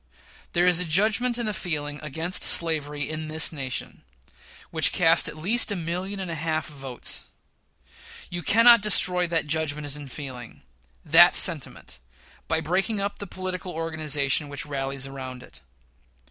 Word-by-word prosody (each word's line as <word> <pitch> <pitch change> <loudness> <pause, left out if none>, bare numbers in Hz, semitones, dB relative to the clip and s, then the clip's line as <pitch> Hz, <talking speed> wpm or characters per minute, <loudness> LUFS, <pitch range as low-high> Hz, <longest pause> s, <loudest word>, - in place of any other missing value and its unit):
There 175 0 +2
is 180 -1 +3
a - - 0
judgment 215 +8 +1
and 235 -2 -3
a 215 - -3
feeling 150 -6 -4
against 160 +4 -2
slavery 150 -4 +2
in 155 0 -6
this 160 +1 -1
nation, 135 -4 -5 0.7
which - - +3
cast - - +4
at - - -10
least 215 +8 +3
a - - -2
million 180 +3 -5
and 185 -3 -4
a - - -4
half 160 0 -3
of - - -14
votes. 130 - -6 1.1
You 175 0 -4
cannot 230 +5 +5
destroy 180 -3 +4
that 165 -1 -1
judgment 150 -2 -1
and 145 -3 -10
feeling 125 -4 -10 0.4
that 170 +3 +6
sentiment 145 - +3 0.5
by 160 0 -1
breaking 190 +7 -2
up 200 +1 -4
the 200 - -7
political 185 0 -6
organization 155 -3 -1
which 140 - -4
rallies 135 -2 -4
around 130 -2 -9
it. - - -17
160 Hz, 155 wpm, -24 LUFS, 145-180 Hz, 1.1 s, that